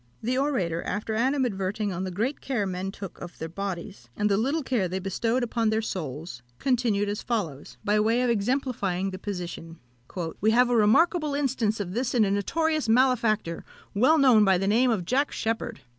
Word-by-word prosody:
The 245 +3 0
orator, 210 - 0
after 210 +3 -3
animadverting 215 -5 0
on 185 +2 -3
the - - -3
great 225 +10 -2
care 240 -7 -1
men 190 0 -3
took 195 -2 -9
of 175 0 -9
their 160 - -5
bodies, 170 -10 -6
and 210 0 +1
the - - +4
little 275 +9 0
care 240 -8 0
they 185 +2 -3
bestowed 225 +6 -1
upon 230 -1 0
their 220 +1 0
souls, 155 - -5 0.2
continued 235 - +1
as 205 +1 -3
follows, 155 - -4
by 210 +1 +3
way 225 +4 +2
of 250 - +1
exemplifying 205 -5 -1
the 185 - -7
position: 175 -4 -6 0.6
"We 215 - +4
have 245 +2 +4
a - - +3
remarkable 295 - +3
instance 250 -7 0
of 185 -3 -4
this 245 +3 -1
in 225 -3 +5
a 195 - 0
notorious 310 - 0
malefactor, 225 -8 +2 0.3
well 260 +10 +4
known 255 -7 +6
by 190 -2 +4
the 195 - -1
name 240 +5 +3
of 205 -7 0
Jack 270 +9 +1
Sheppard. 225 0 -3
215 Hz, 190 wpm, -26 LUFS, 190-250 Hz, 0.6 s, known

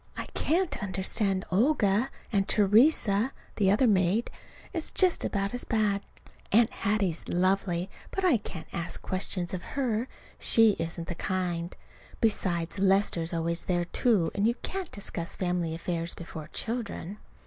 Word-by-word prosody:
I - - -3
can't 350 +3 0
understand 195 0 0
Olga, 220 +1 +3 0.2
and 195 -1 +2
Theresa, 215 +2 +4 0.2
the 195 -3 +3
other 210 +7 +4
maid, 200 +1 +2 0.4
is 330 -3 -3
just 370 -2 +2
about 200 0 -1
as 245 - -1
bad. 210 -3 +1 0.5
Aunt 225 +2 +5
Hattie's 200 -5 -1
lovely, 185 -1 +1 0.2
but 385 - -2
I 325 -9 +5
can't 185 -5 -8
ask 170 0 -3
questions 185 -1 -1
of 185 - -3 0.2
her. 240 -3 0 0.3
She 225 -1 +5
isn't 165 0 -4
the - - -2
kind. 175 -1 -2 0.4
Besides, 180 -6 0
Lester's 195 -4 +2
always 170 0 -1
there, 175 -1 0
too; 195 -2 +2
and 205 +2 +2
you 235 - +1
can't 380 -3 -4
discuss 175 -4 -5
family 175 -3 -1
affairs 170 0 -3
before 160 -2 -8
children. 220 -4 -4
195 Hz, 140 wpm, -28 LUFS, 175-225 Hz, 0.5 s, Aunt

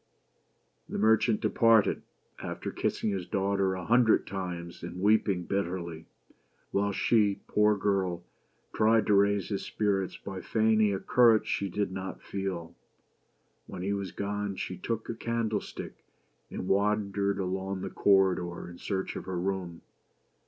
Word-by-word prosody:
The - - -4
merchant 110 +1 +3
departed, 115 -3 +4 0.4
after - - -5
kissing 105 - -1
his 95 -3 -3
daughter 95 -1 0
a 90 -2 -6
hun 120 +4 +5
dred 110 - +3
times, 90 -3 -5
and 85 +2 -7
weeping 100 -2 +2
bitterly; 85 -4 -3 0.6
while 100 +1 +1
she, 105 0 +2
poor 105 0 +3
girl, 95 -3 0 0.5
tried 110 +1 +3
to 105 - +3
raise 100 -1 +3
his 100 -2 -2
spirits 100 -3 -1
by 95 -1 -7
feigning 110 -1 +2
a 95 - -1
courage 115 -1 +4
she 100 - -1
did 100 +1 -2
not 95 0 -5
feel. 95 -4 -4 0.9
When 90 - -7
he 100 +2 0
was 100 -2 -3
gone, 100 0 -3
she 95 - -4
took 115 +4 -4
a - - -3
candlestick 115 -2 -3 0.5
and 90 - -5
wandered 100 0 +1
along 95 0 -3
the - - -5
corridor 95 -3 +2
in 85 - -12
search 95 -2 -3
of - - -6
her 90 -2 -3
room. 90 -2 -3
100 Hz, 145 wpm, -29 LUFS, 95-105 Hz, 0.9 s, hun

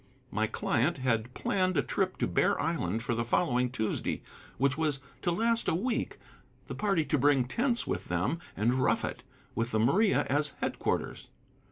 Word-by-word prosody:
My - - +1
client 140 +9 0
had 120 -2 0
planned 185 -3 0
a 140 - +3
trip 190 -1 -1
to - - 0
Bear - - +2
Island 160 -9 -1
for 120 - -1
the 115 0 0
following 125 0 +1
Tuesday, 110 -4 -2 0.3
which 140 +1 +2
was 150 -3 0 0.2
to 175 - 0
last 230 +5 +1
a - - +2
week, 230 +6 -1 0.5
the - - -6
party 195 -7 +1
to 150 0 +1
bring 135 -2 +4
tents 235 - 0
with - - -3
them 95 - -1 0.2
and 110 +5 +2
rough 130 0 +2
it, - - -5 0.3
with 115 +1 -1
the 110 - 0
Maria 190 - +3
as 145 +1 0
headquarters. - - -2
140 Hz, 175 wpm, -30 LUFS, 120-185 Hz, 0.5 s, bring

